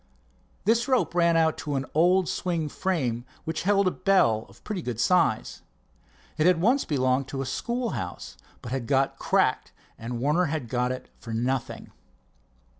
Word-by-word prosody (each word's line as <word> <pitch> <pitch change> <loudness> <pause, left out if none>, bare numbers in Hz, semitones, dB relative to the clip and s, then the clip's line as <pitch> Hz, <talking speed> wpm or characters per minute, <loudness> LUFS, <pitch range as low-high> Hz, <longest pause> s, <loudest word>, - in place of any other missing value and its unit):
This 230 +3 +3
rope 260 -8 +1
ran 170 -1 +3
out 160 -1 +2
to 145 -2 -3
an 135 0 -1
old 180 +3 +3
swing 170 -4 -2
frame 135 -11 -1 0.2
which 160 0 -3
held 200 0 +3
a - - +3
bell 185 - +2
of 100 - -20
pretty 205 -4 -4
good 125 -7 -4
size. 165 -5 +1 0.8
It 155 - +4
had 180 -2 +4
once 245 +10 +2
belonged 130 -2 +1
to 135 -1 -4
a - - -6
school 235 - -2
house, 90 -1 -6 0.3
but 120 - -7
had 130 -3 -3
got 135 -1 +1
cracked, - - +1 0.3
and 115 +1 -5
Warner 150 +8 +2
had 145 -6 -3
got 125 0 0
it 130 - -7
for 115 - -7
nothing. 125 +2 -2
155 Hz, 170 wpm, -26 LUFS, 125-180 Hz, 0.8 s, It